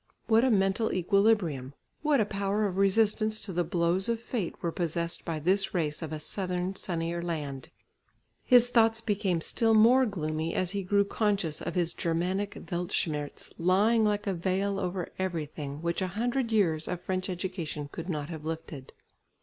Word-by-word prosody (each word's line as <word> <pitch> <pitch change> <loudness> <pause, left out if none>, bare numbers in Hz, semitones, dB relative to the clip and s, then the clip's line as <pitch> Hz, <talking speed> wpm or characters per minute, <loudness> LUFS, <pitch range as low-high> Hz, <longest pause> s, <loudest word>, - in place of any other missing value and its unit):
What 225 +1 +4
a 260 - +4
mental 195 +1 +2
equilibrium, 180 - +1 0.3
what 300 -3 +3
a 215 - +3
power 200 +1 -1
of 190 -2 -2
resistance 215 +2 +2
to 195 - -5
the 175 +1 +1
blows 170 +4 0
of 230 -1 0
fate 230 -6 -3
were 170 - 0
possessed 170 0 -2
by 165 -2 -3
this 190 +5 +1
race 155 -3 -1
of 160 -2 -5
a 155 - -4
southern 180 +2 -2
sunnier 170 -2 -3
land! 155 -4 -4 0.7
His 245 -1 +5
thoughts 225 -1 +4
became 200 -6 0
still 225 +5 +2
more 245 +4 +6
gloomy 160 -4 -2
as 185 -1 0
he 200 0 -2
grew 200 +2 +2
conscious 200 -7 0
of - - -4
his 170 -2 +1
Germanic 180 +5 -1 0.2
"Weltschmerz" 165 -4 -2
lying 205 +6 +3
like 210 -1 +1
a 195 - 0
veil 190 +3 -1
over 180 -1 -2
everything, 155 -5 -4
which 170 +2 -1
a 185 - 0
hundred 245 +1 0
years 165 -8 +2
of 180 - -3
French 185 +1 -3
education 175 -5 -4
could 170 +3 -6
not 150 -3 -3
have 160 -3 -7
lifted. 160 -4 -6
185 Hz, 170 wpm, -29 LUFS, 165-210 Hz, 0.7 s, more